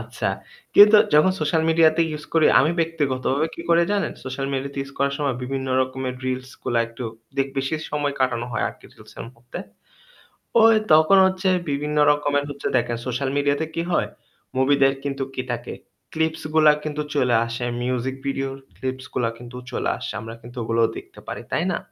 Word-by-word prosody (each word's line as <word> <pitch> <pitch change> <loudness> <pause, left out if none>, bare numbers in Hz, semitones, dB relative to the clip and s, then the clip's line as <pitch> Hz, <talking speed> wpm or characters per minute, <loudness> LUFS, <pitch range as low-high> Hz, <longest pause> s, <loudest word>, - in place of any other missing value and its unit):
আচ্ছা। - - -5 0.5
কিন্তু 210 +1 +9 0.2
যখন 170 +5 +5
সোশ্যাল 160 +1 +1
মিডিয়াতে 160 0 +4
ইউস 150 0 -6
করি 160 -2 +5
আমি 155 +4 +3
ব্যক্তিগতভাবে 145 -2 0
কি - - -8
করে 170 0 +5
জানেন? 205 -1 0
সোশ্যাল 130 +1 -4
মিডিয়াতে 140 +1 -3
ইউস 140 0 -11
করার 140 0 +1
সময় 140 -4 -1
বিভিন্ন 135 +1 -3 0.2
রকমের 130 0 -4
রিলস 130 +1 -3
গুলা 120 - +1
একটু 115 +1 -8 0.3
দেক 135 0 +1
বিশেষ 135 +4 -2
সময় 145 -1 0
কাটানো 120 -2 0
হয় - - 0
আরকি - - -14
রিলসের - - -12
মধ্যে। 120 +1 -9 1.1
ওই 225 0 +7 0.2
তখন 155 +5 +6
হচ্ছে 190 0 +1 0.2
বিভিন্ন 150 +1 -2
রকমের 145 -1 +1
হচ্ছে 145 - -4
দেখেন 120 0 -1
সোশ্যাল 130 +2 -1
মিডিয়াতে 145 +2 +1
কি 165 - 0
হয় - - +1 0.5
মুভিদের 135 0 +4
কিন্তু 140 -1 -2
কি 130 - -1
থাকে? 120 0 -5 0.4
ক্লিপস 160 0 -1
গুলা 155 -1 +7
কিন্তু 150 -1 -3
চইলা 125 -5 +3
আসে। 115 +1 -4 0.2
মিউজিক 130 +1 -2
ভিডিও 135 0 -1 0.3
ক্লিপস 130 0 -4
গুলা 120 -2 +1
কিন্তু 120 +1 -10
চলে - - -1
আসে। - - -5
আমরা 115 +1 -8
কিন্তু 120 +2 -13
ওগুলোও 115 0 +2
দেখতে - - -11
পারি। - - -6
তাই - - +1
না? - - 0
140 Hz, 175 wpm, -23 LUFS, 130-155 Hz, 1.1 s, কিন্তু